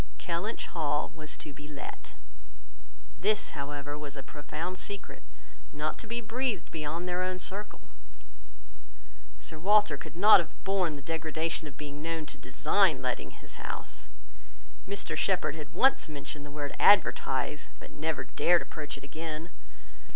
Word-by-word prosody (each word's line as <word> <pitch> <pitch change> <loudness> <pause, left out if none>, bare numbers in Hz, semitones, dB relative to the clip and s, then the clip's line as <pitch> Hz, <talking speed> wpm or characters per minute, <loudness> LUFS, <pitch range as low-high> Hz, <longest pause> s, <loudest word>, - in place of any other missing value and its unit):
Kellynch 180 +6 -2
Hall 150 -3 0
was 155 -2 -5
to 150 - -8
be 150 +1 -10
let. 150 -2 -8 1.0
This, 210 +5 +2
however, 145 0 -4
was 145 -2 -6
a 135 - -5
profound 160 +5 -5
secret, 200 -1 -5 0.5
not 150 +1 -2
to - - -7
be 235 +1 -1
breathed 230 -4 -1
beyond 160 +3 -3
their 180 0 0
own 185 0 0
circle. 205 +3 -4 1.6
Sir 160 - -4
Walter 205 -3 +5
could 140 - -9
not 205 +4 +9
have 170 - -4
borne 190 -5 +2
the 140 - -8
degradation 160 +1 -1
of 145 - -10
being 145 -1 -6
known 165 0 -2
to - - -9
design 150 +2 +3
letting 125 - -1
his - - -10
house. - - -6 0.8
Mr 200 0 -1
Shepherd 180 -6 +2
had 150 -2 -8
once 265 -10 +5
mentioned 145 0 -5
the - - -8
word 145 0 -4
"advertise," 150 -7 +4
but - - -11
never 160 0 -1
dared 175 0 +4
approach 150 -2 -5
it - - -12
again. 160 +3 -5
160 Hz, 150 wpm, -31 LUFS, 145-185 Hz, 1.6 s, not